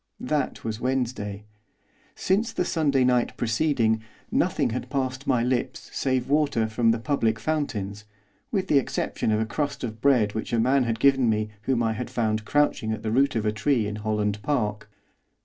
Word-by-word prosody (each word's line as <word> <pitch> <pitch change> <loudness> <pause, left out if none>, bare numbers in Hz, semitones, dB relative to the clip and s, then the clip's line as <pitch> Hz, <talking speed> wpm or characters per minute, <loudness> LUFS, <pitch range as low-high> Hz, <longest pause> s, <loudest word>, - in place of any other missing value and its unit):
That - - -2
was 110 -1 -3
Wednesday. 120 -6 -2 0.7
Since 220 +5 0
the - - 0
Sunday 140 -5 +2
night 125 -1 +1
preceding 115 -2 +1 0.3
nothing - - +1
had 125 - -4
passed 130 -1 -2
my 120 -2 +2
lips 125 0 -2
save 130 -2 0
water 140 -6 +2
from 115 +1 +1
the 115 - +3
public 115 -3 0
fountains, 105 -7 -3 0.5
with 190 -2 0
the 145 - +5
exception 125 - -2
of 105 - +2
a 110 - +1
crust 140 +5 -3
of 110 -2 -5
bread 120 -7 +3
which 110 +2 -4
a 115 - +3
man 130 +3 +3
had 115 -1 -1
given 135 -2 +4
me 105 0 0 0.2
whom 120 -3 +2
I 110 -1 +1
had 125 +3 -5
found 110 -2 -1
crouching 145 -6 +1
at 110 -1 -4
the 110 - -1
root 135 +3 +3
of 110 -1 0
a 105 - +2
tree 115 +2 +1
in 105 +1 -4
Holland 105 -1 -1
Park. 105 -6 -1
120 Hz, 185 wpm, -25 LUFS, 110-135 Hz, 0.7 s, the